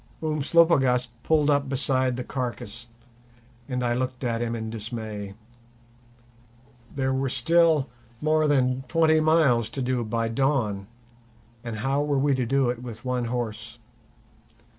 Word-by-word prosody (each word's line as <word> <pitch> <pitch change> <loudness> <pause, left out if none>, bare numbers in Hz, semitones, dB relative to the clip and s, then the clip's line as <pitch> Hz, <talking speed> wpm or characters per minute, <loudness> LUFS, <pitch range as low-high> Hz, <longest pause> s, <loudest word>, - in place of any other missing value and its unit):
Umslopogaas 150 -5 +3
pulled 150 -2 +2
up 140 -1 +1
beside 130 -2 +1
the 125 - -3
carcase, 120 -3 -5 0.8
and 125 -1 -2
I 120 -1 +1
looked 130 +1 -3
at 115 -2 -1
him 120 0 -2
in 110 -1 -5
dismay. 110 -3 -6 1.6
There 130 -1 0
were 135 0 -1
still 160 +3 +3 0.3
more 155 +1 +2
than 130 -2 +1
twenty 160 +3 +3
miles 155 -8 +3
to 135 - -5
do 125 -1 0
by 115 +1 -1
dawn, 115 -5 0 0.8
and 115 -2 -5
how 135 +6 0
were 145 -1 0
we 140 +1 +2
to 130 -3 -1
do 135 +1 +2
it 120 -1 -7
with 120 -1 -8
one 125 -1 -1
horse? 115 -1 -4
125 Hz, 140 wpm, -25 LUFS, 115-140 Hz, 1.6 s, Umslopogaas